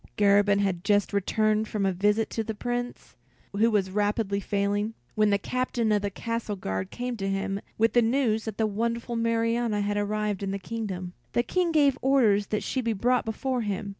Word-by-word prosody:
Garabin 205 0 +4
had 185 -3 -1
just 205 -1 +2
returned 215 +2 +1
from 210 -2 -1
a 190 - +1
visit 210 +4 +1
to 225 - -2
the 220 0 -5
Prince, 245 +2 -4 0.4
who 220 +3 +4
was 200 -4 +1
rapidly 205 0 0
failing, 205 +2 -1 0.2
when 215 -1 +3
the 200 - +3
Captain 240 +1 -1
of 210 -1 +2
the 205 - -1
Castle 230 +1 -3
Guard 95 - -3
came 245 0 -4
to 195 -1 -2
him 195 0 -2 0.2
with 225 +1 +2
the 240 - +5
news 225 -2 +1
that 220 -3 -5
the 220 - +2
wonderful 230 +3 -2
Marianna 230 -1 +1
had 205 0 -1
arrived 210 -1 -1
in 195 - -2
the 195 - -2
kingdom. 190 -4 -5 0.2
The 240 - +2
King 355 +6 0
gave 285 -4 +3
orders 225 -7 +3
that 210 - -2
she 260 - -1
be 230 -2 0
brought 245 +4 +1
before 250 +3 -2
him. 205 -1 -3
215 Hz, 195 wpm, -27 LUFS, 200-230 Hz, 0.4 s, the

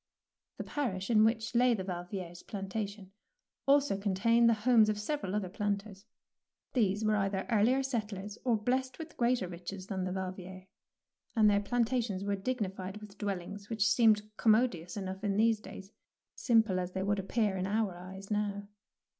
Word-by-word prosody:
' - - -59
The - - -4
parish 235 -8 -2
in 215 -1 +6
which 225 +1 +1
lay 245 0 +4
the 190 - -4
Yalviers' 175 -1 -6
plantation 200 0 -5 0.6
also 275 -7 +4
contained 230 +4 +3
the 230 - +4
homes 220 0 +4
of 210 -1 -1
several 210 -4 -2
other 205 -3 -1
planters. 200 +1 -3 0.7
These 210 -3 +1
were 215 0 +3
either 195 -1 -1
earlier 235 +5 +3
settlers 210 -5 -4
or 240 -3 +2
blessed 260 +4 -1
with 320 0 -8
greater 240 -5 +1
riches 180 +2 -7
than 190 -1 -3
the 185 - -2
Yalviers, 185 0 -6 0.7
and 220 -2 +5
their 205 -1 +4
plantations 230 -2 0
were 200 0 0
dignified 195 -3 -3
with 210 -1 -12
dwellings 200 0 -4
which 220 -2 +1
seemed 215 -1 +4
commodious 215 -5 +2
enough 190 0 -5
in 200 -1 0
those 225 0 +3
days, 195 -1 -10 0.4
simple 225 -6 +2
as 180 0 -4
they 190 - -2
would 205 0 +1
appear 205 +1 0
in 185 0 -2
our 210 -2 0
eyes 190 +3 -10
now. 205 -1 -1
205 Hz, 165 wpm, -32 LUFS, 190-225 Hz, 0.7 s, in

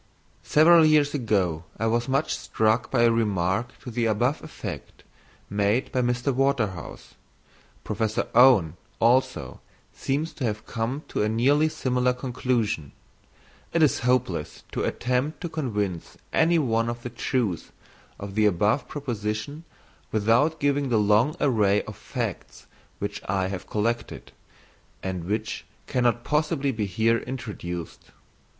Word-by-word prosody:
_ - - -35 0.4
Several 165 +2 +6
years 155 -2 +4
ago 100 - 0
I 110 - -1
was 120 +2 0
much 135 +3 +1
struck 110 +2 0
by 120 -3 +2
a 115 - +5
remark 105 +1 0
to 125 - -6
the 115 0 0
above 120 +7 0
effect 155 - -8 0.4
made 105 +5 0
by 130 - +1
Mr. 125 +2 0
Waterhouse. 120 - -1 0.7
Professor 110 -1 -1
Owen, 105 - +6 0.2
also, 125 +3 +1 0.3
seems 145 +4 -2
to 140 - -6
have 110 -2 -2
come 120 +6 -3
to - - -1
a 105 - +1
nearly 140 +8 +3
similar 125 -3 0
conclusion. 120 - -2 0.8
It 170 - +4
is 150 - +3
hopeless 125 -10 -1
to - - -2
attempt 125 +5 -1
to 175 - -3
convince 105 - -3 0.2
any 165 +1 +4
one 115 -6 +1
of 120 0 -5
the 120 - -5
truth 115 - -2 0.5
of 100 -1 -7
the 105 +1 +3
above 105 +7 +1
proposition 120 +2 -4 0.5
without 115 +9 +2
giving 140 -1 +1
the 115 - +3
long 105 +7 +3
array 105 -6 +2
of - - -9
facts - - -5 0.3
which - - -4
I 95 -1 0
have 95 -2 -6
collected, 115 +3 -2 0.7
and 90 -3 -3
which 110 +3 -3 0.2
cannot 120 -2 +1
possibly 150 -1 0
be 110 -4 -2
here 115 +5 +2
introduced. 105 -10 -6
120 Hz, 135 wpm, -25 LUFS, 105-135 Hz, 0.8 s, Several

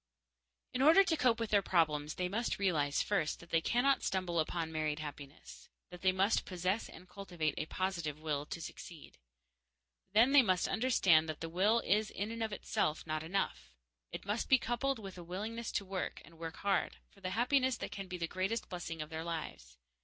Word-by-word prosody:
In 250 - -1
order 320 +7 +8
to 345 -4 +1
cope 245 -6 +2
with 230 -2 -3
their 205 -1 +5
problems 155 -5 +1
they 180 - -1
must 225 +6 -1
realize, 155 -7 +1
first, 195 -7 0
that 170 - -15
they 165 - +3
cannot 265 +8 +2
stumble 185 -3 -1
upon 160 +1 -1
married 155 -1 -1
happiness; 145 -1 -9 0.2
that 180 -1 -10
they 185 - +4
must 195 +3 +2
possess 185 +3 -2
and 180 - -13
cultivate 175 -7 -3
a 155 - -3
positive 170 -6 -2
will 150 -2 -2
to - - -5
succeed. 165 -1 -10 0.9
Then 230 +5 +6
they 285 -1 +8
must 185 -6 +2
understand 195 -8 +3
that 155 - -4
the 165 - -5
will 205 +7 +3
is 210 +2 +1
in 205 +2 -4
itself 205 -7 -1
not 155 -1 -2
enough; 165 - -2 0.4
it - - -7
must 205 +3 -2
be 265 - +7
coupled 255 +3 -1
with 195 -4 -9
a - - -8
willingness 215 +6 -4
to 200 - -1
work, 190 -1 -4
and 165 -1 -17
work 165 -1 -5
hard, 200 -2 0
for 195 - -21
the 185 - -3
happiness 260 +1 +2
that - - -5
can 195 -1 -6
be 180 0 -5
the 170 - -1
greatest 195 +6 -2
blessing 165 -3 -5
of 155 - -13
their 160 0 -4
lives. 155 - -6
185 Hz, 195 wpm, -34 LUFS, 160-215 Hz, 0.9 s, order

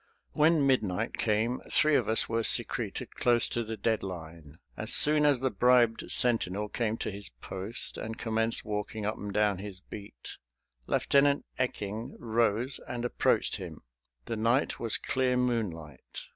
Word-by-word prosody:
When 150 -1 +3
midnight 115 -5 0
came 110 +3 0
three 155 -1 +3
of - - +1
us 110 - +3
were 115 0 -1
secreted - - +2
close 120 -1 +2
to 120 - -2
the 110 0 -6
dead 110 +1 0
line. 80 -4 -9 0.2
As - - -3
soon 150 0 +6
as 140 -4 +2
the 130 -1 0
bribed 125 -2 +2
sentinel 105 -4 +2
came 115 -1 -2
to - - -4
his 100 0 -9
post 95 +5 -1
and 110 0 -6
commenced 115 0 -1
walking 105 0 -4
up 110 - -2
and 105 - -6
down 105 -2 +1
his 100 -2 -8
beat 100 - -10 0.5
Lieutenant 140 0 +2
Ecking 110 -3 -4
rose 115 +2 -1
and 120 0 -4
approached 120 - +1
him. - - -9 0.4
The 115 - -4
night 115 +5 0
was 115 -2 0
clear 130 -1 -1
moonlight. 95 - -3
115 Hz, 155 wpm, -29 LUFS, 105-125 Hz, 0.5 s, soon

